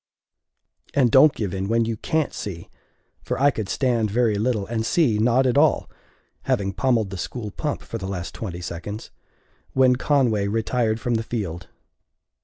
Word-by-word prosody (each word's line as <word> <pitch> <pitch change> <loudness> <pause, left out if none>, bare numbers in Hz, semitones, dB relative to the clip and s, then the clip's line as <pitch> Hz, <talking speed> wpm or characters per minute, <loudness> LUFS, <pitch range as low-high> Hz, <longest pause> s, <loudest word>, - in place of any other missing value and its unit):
And 130 -5 +4
don't 145 +3 +7
give 100 -4 -3
in 95 0 -2
when 115 +1 +2
you 115 0 -2
can't! 155 +7 -1
see! 85 -5 -6 0.5
For - - -3
I 140 +1 +5
could 110 -6 -5
stand 120 -5 +1
very 115 +1 +2
little, 105 0 0
and 110 0 -2
see 125 - +2
not 125 +4 +3
at 130 +2 +3
all 155 +1 +3 0.6
(having 100 -1 0
pommelled 115 -1 +1
the 95 - -5
school 110 0 -5
pump 150 +7 -3
for 115 - -6
the 95 - -5
last 90 -2 -5
twenty 90 -5 -6
seconds), 90 +5 -6 0.6
when 130 -1 +4
Conway 125 -8 +2
retired 110 +1 0
from 120 +1 -1
the - - -1
field. 95 -7 -4
115 Hz, 170 wpm, -23 LUFS, 100-125 Hz, 0.6 s, don't